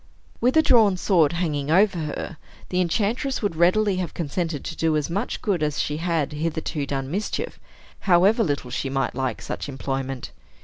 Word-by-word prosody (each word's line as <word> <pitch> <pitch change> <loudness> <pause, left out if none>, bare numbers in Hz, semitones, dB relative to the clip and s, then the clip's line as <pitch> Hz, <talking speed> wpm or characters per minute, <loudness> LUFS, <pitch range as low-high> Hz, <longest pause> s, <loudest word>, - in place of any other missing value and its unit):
With 255 +5 +3
a 315 - +6
drawn 215 -9 +5
sword 170 -5 +3
hanging 150 -5 -1
over 190 +2 +4
her, 155 +1 -4 0.3
the 180 0 +1
enchantress 220 - 0
would 200 -5 0
readily 185 +4 +3
have 180 -3 -3
consented 165 -1 -2
to 165 - -4
do 160 -1 +1
as 150 +2 -2
much 200 +7 -2
good 195 -7 0
as 150 -1 0
she 150 - -1
had 165 -3 -1
hitherto 155 -1 -2
done 135 -1 -3
mischief, 205 +5 -3 0.5
however 195 +6 +5
little 145 - -2
she 135 +2 -2
might 135 0 -1
like 130 -3 -2
such - - -5
employment. 135 -1 -4
165 Hz, 175 wpm, -24 LUFS, 145-190 Hz, 0.5 s, a